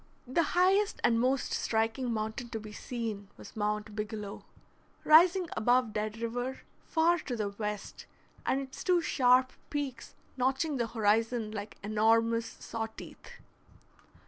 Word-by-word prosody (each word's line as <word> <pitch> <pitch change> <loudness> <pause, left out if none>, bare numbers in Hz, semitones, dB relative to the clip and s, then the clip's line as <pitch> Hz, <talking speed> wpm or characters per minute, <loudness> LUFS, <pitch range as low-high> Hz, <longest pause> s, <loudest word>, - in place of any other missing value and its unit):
The 260 +7 +1 0.2
highest 390 +3 +3
and 230 -1 +4
most 260 +2 +1
striking 225 +3 0
mountain 220 +2 -3
to 225 - -4
be 215 0 -9
seen 220 -4 -5
was - - -12
Mount 210 0 -2
Bigelow, 210 -1 -5 0.6
rising 345 +3 +6
above 245 0 +2
Dead 215 +1 -2
River, 245 +3 -3 0.3
far 335 +1 +3
to 255 -5 -4
the 210 -3 -1
west, 210 0 -5 0.4
and 265 - +1
its 270 -1 -7
two 360 -2 +3
sharp 255 -2 +4 0.2
peaks 275 -5 -4 0.2
notching 270 +4 +1
the 235 -2 0
horizon 225 0 +1
like 210 -1 -6
enormous 225 +2 +2
saw 225 -1 -5
teeth. 220 - -12
230 Hz, 135 wpm, -31 LUFS, 215-265 Hz, 0.6 s, rising